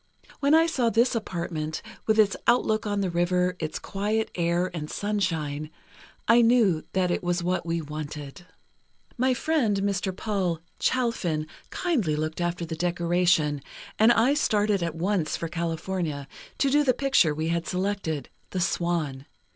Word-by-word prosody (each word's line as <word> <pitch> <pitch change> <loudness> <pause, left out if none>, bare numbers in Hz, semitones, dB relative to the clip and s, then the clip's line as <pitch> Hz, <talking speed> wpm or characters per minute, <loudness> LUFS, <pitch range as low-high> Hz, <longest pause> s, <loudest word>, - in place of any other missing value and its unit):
When 285 +2 +4
I 325 +1 +6
saw 265 -8 +1
this 235 +3 +3
apartment, 170 -8 -3 0.2
with 220 0 +3
its 205 -3 +4
outlook 220 -3 +2
on 205 -1 0
the 190 -2 -1
river, 180 +1 +1
its 155 -1 -3
quiet 210 +3 -2
air 175 +1 0
and 155 -3 -5
sunshine, 165 -8 -2 0.6
I 230 +2 +6
knew 225 -9 +4
that 185 -2 +1
it - - 0
was 175 0 0
what 180 -1 -1
we 165 -1 -1
wanted. 150 0 -7 0.7
"My 255 +1 +2
friend, 245 -9 +1
Mr. 195 -1 0
Paul 185 -4 -1 0.2
Chalfin, 195 -11 0 0.2
kindly 240 - 0
looked 155 +2 -3
after 175 0 -1
the 160 0 -5
decoration, 175 -3 +1 0.4
and 220 +2 +7
I 240 +4 +4
started 210 -8 +2
at 165 -2 -2
once 175 -1 0
for 165 - -3
California, 165 -3 -3 0.3
to 275 - +2
do 295 +1 +4
the 255 -4 +2
picture 265 - +3
we 160 +1 -2
had 170 0 -1
selected, 185 -7 -2 0.2
'The 185 - -3
Swan. 170 -6 -1
180 Hz, 155 wpm, -26 LUFS, 165-215 Hz, 0.7 s, and